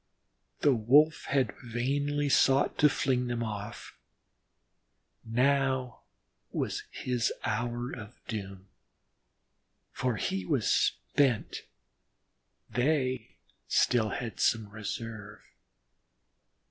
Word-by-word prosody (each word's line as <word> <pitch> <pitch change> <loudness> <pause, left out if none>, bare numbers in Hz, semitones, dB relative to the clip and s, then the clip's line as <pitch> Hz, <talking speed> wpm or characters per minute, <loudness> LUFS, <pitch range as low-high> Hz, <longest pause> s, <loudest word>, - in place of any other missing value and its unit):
The 145 - +5
Wolf 140 +8 +4
had 135 -6 +1
vainly 140 +5 -1
sought 135 0 +4
to 150 - +7
fling 130 -3 0
them 120 -1 -2
off. 105 0 -7 1.2
Now 130 +1 +1 0.5
was - - -2
his 125 -2 -1
hour 120 +3 -2
of 105 -4 -9
doom, 95 -4 -6 1.3
for 125 -3 -1
he 95 -2 -2
was - - 0
spent; 135 -6 +1 1.1
they 130 0 0 0.3
still 115 - +3
had 115 +2 -5
some 110 -3 +2
reserve. 110 0 -6
120 Hz, 85 wpm, -30 LUFS, 110-135 Hz, 1.3 s, to